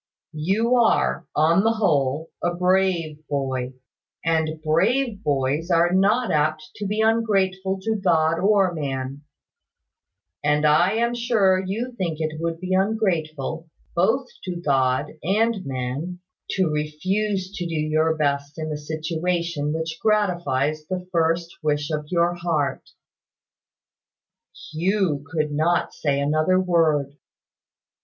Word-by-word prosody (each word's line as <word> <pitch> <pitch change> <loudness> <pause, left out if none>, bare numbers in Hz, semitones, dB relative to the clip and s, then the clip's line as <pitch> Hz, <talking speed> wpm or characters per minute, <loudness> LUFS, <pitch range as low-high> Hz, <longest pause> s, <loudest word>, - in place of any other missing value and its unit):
You 200 +11 +1
are, 225 - +2
on 165 +5 +4
the 225 +1 +3
whole, 150 -7 0
a 175 0 0
brave 180 -4 +1
boy; 130 -2 -2 0.5
and 160 -1 0
brave 205 - +1
boys 145 +4 0
are 170 0 +3
not 210 +6 +3
apt 155 +7 0
to 205 - -3
be 210 +2 0
ungrateful 195 -4 +1
to 220 +1 0
God 165 -3 +3
or 195 -2 +3
man; 135 -2 -4 1.2
and 150 +1 +2
I 160 +6 +4
am 235 +2 +1
sure 215 -6 +2
you 225 +7 -3
think 170 -4 -1
it 155 0 -3
would 165 0 -2
be 185 +1 -3
ungrateful, 165 -6 -1 0.3
both 225 +10 +2 0.2
to 180 -1 -3
God 135 -3 +1
and 210 +3 +1
man, 135 +7 -4 0.4
to 190 - +2
refuse 185 +6 -1
to 175 - -3
do 165 - -4
your 155 +1 +1
best 145 0 -1
in 155 -1 -4
the 150 -1 -3
situation 160 0 -2
which 160 +1 -3
gratifies 175 -9 +1
the 185 -1 -4
first 165 0 0
wish 150 -1 -1
of 150 -1 -2
your 175 +1 +2
heart." 170 -5 -2 1.8
Hugh 175 -3 0
could 150 -1 -1
not 160 +4 +1
say 140 -2 0
another 155 +6 +2
word. 155 -6 +1
165 Hz, 125 wpm, -23 LUFS, 150-190 Hz, 1.8 s, on